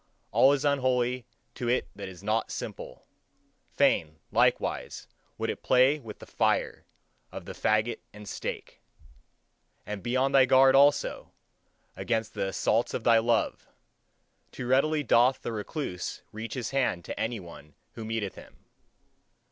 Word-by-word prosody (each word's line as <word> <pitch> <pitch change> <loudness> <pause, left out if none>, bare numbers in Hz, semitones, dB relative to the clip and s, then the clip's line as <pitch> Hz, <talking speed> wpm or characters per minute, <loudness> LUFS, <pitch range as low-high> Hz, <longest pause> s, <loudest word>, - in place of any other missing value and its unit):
All 135 - +6
is 145 0 0
unholy 130 -3 +1 0.3
to 120 - -3
it 125 - +1
that 100 -1 -7
is 95 0 -13
not 110 +2 0
simple; - - -7 0.7
fain, 80 -1 +2
likewise, - - 0 0.3
would - - -1
it - - -8
play 130 +4 +4
with 110 -6 -10
the - - -12
fire - - 0 0.5
of - - -8
the - - -7
fagot 110 +2 0
and 105 0 -12
stake. - - -6 1.0
And 105 -1 -5
be 120 +4 -1
on 135 +1 +2
thy 135 -2 +5
guard, 130 +1 +6
also, 140 +1 +3 0.6
against 110 -2 -2
the 95 - -2
assaults 110 +4 0
of 115 - -4
thy 115 -1 +5
love! 115 0 0 0.8
Too 125 - -6
readily 145 +4 +2
doth 125 +1 +3
the - - -3
recluse 105 - -5
reach 110 +1 -6
his 125 -4 -4
hand 130 -11 0
to - - -6
any 115 0 -2
one 75 -5 -13 0.2
who 115 - -8
meeteth 110 -3 -3
him. - - -16
120 Hz, 150 wpm, -28 LUFS, 105-130 Hz, 1.0 s, All